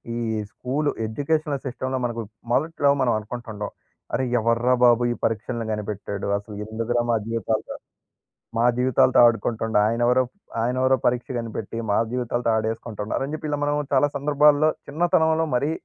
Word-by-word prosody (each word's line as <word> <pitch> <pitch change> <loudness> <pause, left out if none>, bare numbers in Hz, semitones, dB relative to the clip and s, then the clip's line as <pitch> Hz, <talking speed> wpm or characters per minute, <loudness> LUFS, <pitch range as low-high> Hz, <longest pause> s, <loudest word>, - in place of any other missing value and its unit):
ఈ - - -3 0.3
school 140 +5 -2 0.2
educational 145 +4 -1
సిస్టమ్‌లో 130 +1 -3
మనకు 115 -1 -3 0.3
మొదట్లో 145 +1 +2
మనం 120 -2 +3
అనుకుంటుంటాం. 110 -1 -6 0.4
"అరె! 130 - +1 0.2
ఎవర్రా 115 +3 +2
బాబు 120 0 +5
ఈ - - +1
పరీక్షలను 115 +1 -1
కనిపెట్టాడు? 105 -1 -4
అసలు 105 0 -9
ఎందుకురా 115 +2 -1
మా - - +3
జీవితాలు 115 -1 -2 0.8
మా 115 - +3
జీవితాలతో 130 0 +4
ఆడుకుంటుండు. 115 -1 +1
ఆయనెవరో, 120 +3 +3 0.4
ఆయనెవరో 130 +2 +2
పరీక్ష 125 +1 0
కనిపెట్టి 115 -1 -5
మా - - +3
జీవితాలతో 120 -1 -1
ఆడేస్కుంటుండు" 110 -1 -3
అని 145 - -6
చెప్పి, 155 -1 -5
ఇలా 145 - -1
మనం 145 0 +1 0.2
చాలా 145 +2 +4
సందర్భాల్లో 150 +2 +4 0.2
చిన్నతనంలో 160 0 +2
మరి 145 +5 0
120 Hz, 135 wpm, -24 LUFS, 115-140 Hz, 0.8 s, బాబు